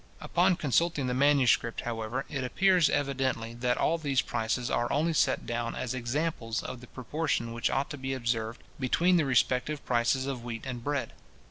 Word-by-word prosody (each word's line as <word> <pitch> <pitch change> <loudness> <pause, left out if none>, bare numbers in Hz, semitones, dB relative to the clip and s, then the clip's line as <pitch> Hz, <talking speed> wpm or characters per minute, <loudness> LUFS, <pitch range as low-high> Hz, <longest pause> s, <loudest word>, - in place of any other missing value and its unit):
Upon 180 +1 +2
consulting 160 -1 +1
the 125 - -1
manuscript, 130 -4 +3
however, 120 +3 -3
it 140 -3 -3
appears 180 +5 +3
evidently, 130 -5 -1
that 125 +1 0
all 165 +1 +1
these 140 -4 +1
prices 115 +2 -2
are 120 - 0
only 160 +4 +1
set 140 -4 +2
down 120 0 -2
as 125 - -3
examples 125 -1 -2
of 125 -1 -6
the 125 - -12
proportion 130 -2 -2
which 115 - 0
ought 135 +2 -1
to 145 - -6
be 135 0 -2
observed 115 -2 -2 0.2
between 175 +8 +3
the 160 - +2
respective 130 +3 +1
prices 125 +2 +1
of 135 -3 -4
wheat 115 0 -6
and 125 -3 -5
bread. 145 0 -2
130 Hz, 175 wpm, -29 LUFS, 120-145 Hz, 0.2 s, manuscript